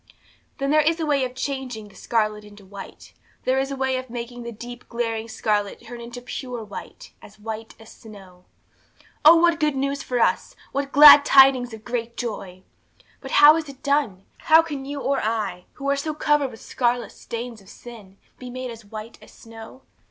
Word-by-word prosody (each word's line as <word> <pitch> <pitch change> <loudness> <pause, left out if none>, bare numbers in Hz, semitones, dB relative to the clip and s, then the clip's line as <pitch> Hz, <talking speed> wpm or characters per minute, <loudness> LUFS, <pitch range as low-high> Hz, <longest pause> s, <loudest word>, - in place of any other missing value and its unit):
'Then 275 0 -1
there 305 0 +5
is 325 +3 +1
a 320 - -1
way 285 -3 +1
of 250 0 -4
changing 255 -5 -5
the 200 - -19
scarlet 215 -2 -1
into 205 -1 -15
white; 195 0 -12 0.3
there 260 +1 +1
is 270 0 -1
a 275 - -4
way 265 -1 -1
of 255 0 -7
making 240 +1 -7
the 235 0 -6
deep, 240 +2 -10
glaring 230 -1 -3
scarlet 210 -2 -2
turn 240 +1 -9
into 235 +1 -8
pure 245 -1 -6
white, 205 -2 -10
as 210 - -15
white 220 +1 -7
as 225 - -14
snow. 190 -5 -15 0.8
'Oh, 315 +3 +9
what 340 0 +3
good 300 -2 +1
news 275 +1 -2
for 250 -1 -2
us! - - 0 0.2
What 280 0 -3
glad 290 0 +10
tidings 265 -3 +5
of 220 -1 -11
great 235 -1 -4
joy! 190 -6 -6 0.6
'But - - -8
how 305 +1 +9
is 315 -3 -5
it 275 -1 -13
done? 280 -10 0
How 320 +1 +5
can 290 -5 -6
you 285 +1 -5
or 275 0 0
I, 210 -5 -3
who 275 - -7
are - - +2
so 300 +2 -4
covered 295 -2 +1
with 225 - -13
scarlet 245 -1 -1
stains 235 -1 -7
of 195 - -18
sin, 215 -5 -13 0.2
be 250 - -8
made 255 0 -6
as 230 -1 -11
white 215 +2 -10
as - - -16
snow? 225 +3 -13
245 Hz, 195 wpm, -23 LUFS, 220-275 Hz, 0.8 s, glad